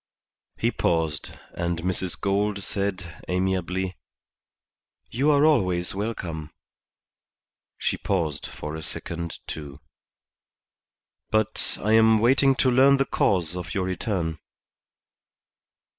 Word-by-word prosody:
He - - +1
paused 80 -3 0 0.2
and 85 -1 -2
Mrs. 90 0 -1
Gould 100 0 0
said, 95 -4 -3
amiably, 95 0 -1 1.1
"You 135 +6 +2
are 145 0 +5
always 90 - +2
welcome." 90 -7 -4 1.3
She - - -1
paused 80 -7 -1
for 75 +1 -6
a 80 - -6
second, 85 +1 -6
too. 70 -2 -7 1.5
"But 110 0 -1
I 105 - 0
am 110 0 +6
waiting 135 +4 +4
to 130 0 +3
learn 135 +2 +6
the 135 - +2
cause 90 -8 +1
of 90 -2 -5
your 95 -2 0
return." 90 -3 -2
95 Hz, 105 wpm, -25 LUFS, 85-110 Hz, 1.5 s, am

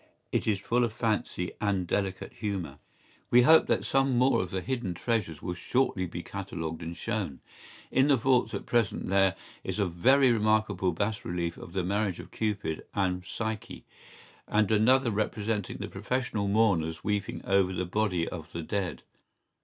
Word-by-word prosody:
¬Ý - - -32 0.4
It - - -9
is 105 -2 +3
full 120 +5 +1
of 115 -2 -1
fancy 105 -6 -1
and 100 -3 +1
delicate 95 +1 -2
humour. 95 -10 -4 0.5
We 125 0 +6
hope 160 +5 +7
that - - +1
some 135 -2 +2
more 130 +2 +4
of 90 - -4
the 95 +1 -3
hidden 120 -6 -3
treasures 90 -7 -2
will 90 - -2
shortly 95 0 0
be 85 0 -6
catalogued 80 -5 -5
and 85 +1 -5
shown.¬Ý 105 - -3 0.5
In 130 +2 +4
the 145 - +5
vaults 125 +1 +2
at - - -5
present 115 -4 +1
there 95 -1 +3 0.3
is - - -3
a 100 - +2
very 125 +10 +4
remarkable 110 -4 +2
bas 100 +5 -2
relief 85 -1 -2
of 85 - -11
the 95 - 0
marriage 100 0 -1
of - - -10
Cupid 105 -7 -2
and 90 -2 0
Psyche, 110 +2 -5 0.6
and 105 0 +2
another 120 +4 +4
representing 105 -1 -2
the - - -5
professional 105 0 -2
mourners 90 -7 +2
weeping 105 -1 -2
over 95 -1 +3
the 90 0 -2
body 90 -3 0
of 80 -4 -7
the 85 - -4
dead. 95 +1 -3
100 Hz, 170 wpm, -29 LUFS, 90-110 Hz, 0.6 s, hope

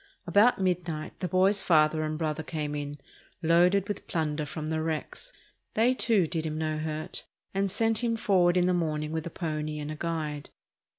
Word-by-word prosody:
About 215 +3 +4
midnight 175 -4 -2
the 185 - -1
boy's 190 +3 +3
father 155 -2 +4
and 155 0 -2
brother 155 -1 -1
came 150 -2 -4
in, 145 0 -4 0.5
loaded 180 +4 +4
with 205 - -5
plunder 150 -2 -1
from 155 0 -5
the 160 0 -1
wrecks. 160 - -4 0.4
They, 235 +4 +4
too, 220 -7 +3
did 160 0 -2
him 155 -1 -3
no 155 -1 -1
hurt 155 +2 -4 0.3
and 195 0 +1
sent 225 +3 +1
him 230 -1 +1
forward 185 -5 +3
in 180 - +4
the 180 - +3
morning 155 -3 -1
with 160 0 -3
a - - -4
pony 155 -3 -3
and 150 0 -4
a - - -4
guide. 155 -3 -3
160 Hz, 185 wpm, -28 LUFS, 155-185 Hz, 0.5 s, About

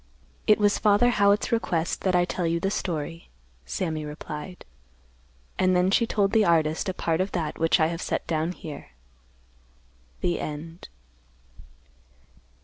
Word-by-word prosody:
"It 215 - +6
was 205 -1 +2
Father 210 +4 +4
Howitt's 200 -2 +3
request 175 -8 0
that 185 -2 +1
I 175 0 +4
tell 180 -1 -2
you 165 +1 0
the 195 +3 -1
story," 165 -3 -4 0.4
Sammy 160 -4 -2
replied. 150 +3 -8 0.9
And 185 0 +3
then 180 +1 +3
she 230 +3 +3
told 200 -3 +1
the 220 -1 +4
artist 160 -1 +2
a - - -1
part 165 0 0
of 190 - -3
that 165 -4 -3
which 165 0 +3
I 155 - +4
have 165 +2 -3
set - - -2
down 160 +2 -1
here. 150 - -10 1.3
THE 175 - 0
END. 165 +3 -7
175 Hz, 145 wpm, -26 LUFS, 160-195 Hz, 1.3 s, It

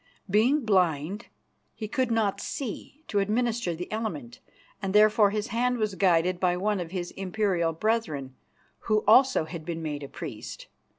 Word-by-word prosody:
Being 230 +8 +3
blind, 185 0 +1 0.5
he 215 - -5
could 260 +2 0
not 210 -4 0
see 275 +3 -6
to 205 - 0
administer 220 -2 0
the 180 +2 -7
Element, 170 - -4 0.4
and 195 0 -2
therefore 210 0 +6
his 210 +2 -3
hand 250 +2 +1
was 215 -3 -1
guided 180 -1 +2
by 180 -1 +2
one 205 +2 0
of 170 -2 -4
his 175 -1 -4
imperial 190 -3 0
brethren, 160 - -1 0.5
who 215 -1 +2
also 255 -5 +5
had 165 0 -7
been 165 0 -5
made 150 -2 -4
a 140 - -6
priest. - - -8
200 Hz, 160 wpm, -27 LUFS, 175-220 Hz, 0.5 s, therefore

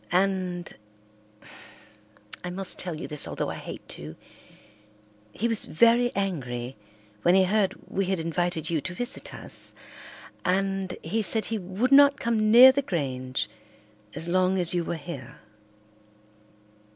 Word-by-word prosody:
And—I 180 - -5
must 185 +1 -3
tell 170 -4 -3
you - - -6
this 150 -2 -2
although - - -3
I - - -6
hate - - -9
to—he 105 - -10
was 225 -2 -1
very 235 +7 +3
angry 130 -11 -3 0.5
when 175 +1 +4
he 190 - +5
heard 195 +1 +1
we 195 - -1
had 190 -2 -1
invited 165 0 -1
you 160 -3 0
to 180 +5 -6
visit 245 +6 -2
us, - - +3 0.7
and 195 0 -1
he 215 +8 -1
said 220 +1 +1
he 225 -1 -2
would 190 +8 -2
not 280 +1 +7
come 225 -3 +1
near 250 +4 +10
the 280 +2 0
Grange 130 - -3 0.7
as 165 - -3
long 185 +1 +2
as 175 -2 +1
you 175 -1 0
were 170 - -3
here. 145 -6 -8
180 Hz, 135 wpm, -26 LUFS, 150-215 Hz, 0.7 s, near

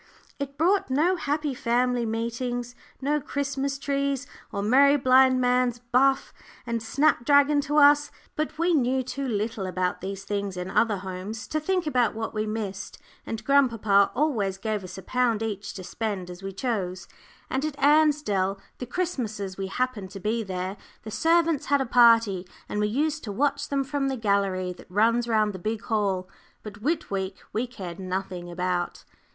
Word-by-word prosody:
It 280 0 -5
brought 375 +4 +2
no 315 +8 +3
happy 295 -3 -1
family 245 -1 +1
meetings, 235 +2 -3 0.3
no 295 +2 +1
Christmas 275 0 -2
trees, 280 -1 -1 0.3
or 200 - -3
merry 280 +6 +5
blind 260 -1 +5
man's 250 -1 +2
buff 255 +3 +2 0.3
and 235 -1 -2
snap 260 +3 +2
dragon 285 +2 +4
to 295 +1 -1
us. 290 0 +6 0.3
But 310 0 -2
we 340 +2 +2
knew 260 -3 +2
too 270 +2 -4
little 215 -3 -2
about 185 0 -1
these 195 +1 -5
things 200 -2 -3
in 180 +1 -4
other 220 -3 +2
homes 190 +4 -6
to 310 - 0
think 365 +3 0
about 250 -7 +1
what 225 0 -4
we 215 0 -2
missed, 210 -3 -4 0.3
and 220 -1 -4
grandpapa 230 -8 +4
always 230 -10 0
gave 210 0 -2
us 185 0 -8
a 190 - -8
pound 235 -1 +1
each 205 -2 -4
to 190 - -7
spend 190 -2 -4
as 180 +1 -10
we 195 0 -5
chose. 190 -4 -3 0.4
And 265 +2 -2
at 305 -2 -3
Ansdell, 285 -10 +3 0.2
the 250 - -5
Christmases 225 - -3
we 195 0 -4
happened 225 -2 -2
to 195 - -8
be 220 +4 -1
there, 190 -1 -4 0.3
the 215 - -7
servants 325 +5 +2
had 285 0 +3
a 270 - 0
party, 230 -6 +5 0.2
and 210 - -3
we 210 - +2
used 300 +7 -1
to 210 - -4
watch 280 +8 0
them 275 -1 +1
from 275 0 -1
the 265 -1 -1
gallery 195 -4 0
that 180 - -16
runs 230 +5 +2
round 215 -2 +2
the 185 - -7
big 215 +4 -3
hall. 200 -5 0 0.4
But 210 0 -9
Whit 310 +2 -1
week 190 -1 -2 0.2
we 235 +4 -1
cared 185 -8 -8
nothing 185 -1 -4
about. 180 0 -2
230 Hz, 175 wpm, -26 LUFS, 200-275 Hz, 0.4 s, us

